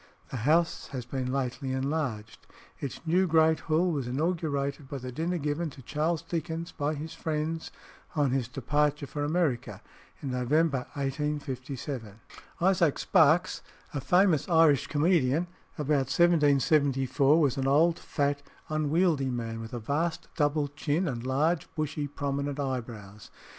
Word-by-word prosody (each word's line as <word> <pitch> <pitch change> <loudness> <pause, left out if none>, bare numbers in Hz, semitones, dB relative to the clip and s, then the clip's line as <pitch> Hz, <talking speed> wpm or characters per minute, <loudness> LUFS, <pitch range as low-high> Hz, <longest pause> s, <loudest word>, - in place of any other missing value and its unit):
The 130 - -3
house 160 +8 +2
has 130 -4 -6
been 130 0 -3
lately 130 0 -2
enlarged. 130 -5 -3 0.3
Its 140 - -5
new 180 +3 +3
great 160 -1 +4
Hall 165 +3 +1
was 140 -6 -2
inaugurated 140 -1 -1
by 140 - -4
the 125 -1 -6
dinner 165 +7 -1
given 150 +2 -2
to 135 -2 -13
Charles 155 +5 -1
Dickens 165 0 -4
by 150 +2 -2
his 155 +3 -6
friends 160 0 -3 0.5
on 145 -4 +2
his 130 -3 0
departure 145 +3 0
for 145 +1 -4
America 150 -5 0 0.4
in 135 - -4
November 135 +2 +1
1857. 135 -5 -4 0.4
Isaac 175 -4 +3
Sparkes, 160 +3 +3 0.3
a 145 - -2
famous 180 0 +3
Irish 160 -5 +4
comedian 155 -1 +2 0.3
about 145 -3 +1
1774, 145 -3 +3
was 140 -6 +2
an 135 0 0
old, 160 +5 +4
fat, 145 -1 -1 0.3
unwieldy 155 -1 +1
man, 115 -2 -3
with 115 - -8
a 120 - -4
vast 155 +8 -2
double 145 0 +1
chin, 150 +4 -1
and 125 -3 -3
large, 155 +6 +1
bushy, 150 -1 -2
prominent 140 0 -3
eyebrows. 115 -7 -5
145 Hz, 135 wpm, -28 LUFS, 135-160 Hz, 0.5 s, great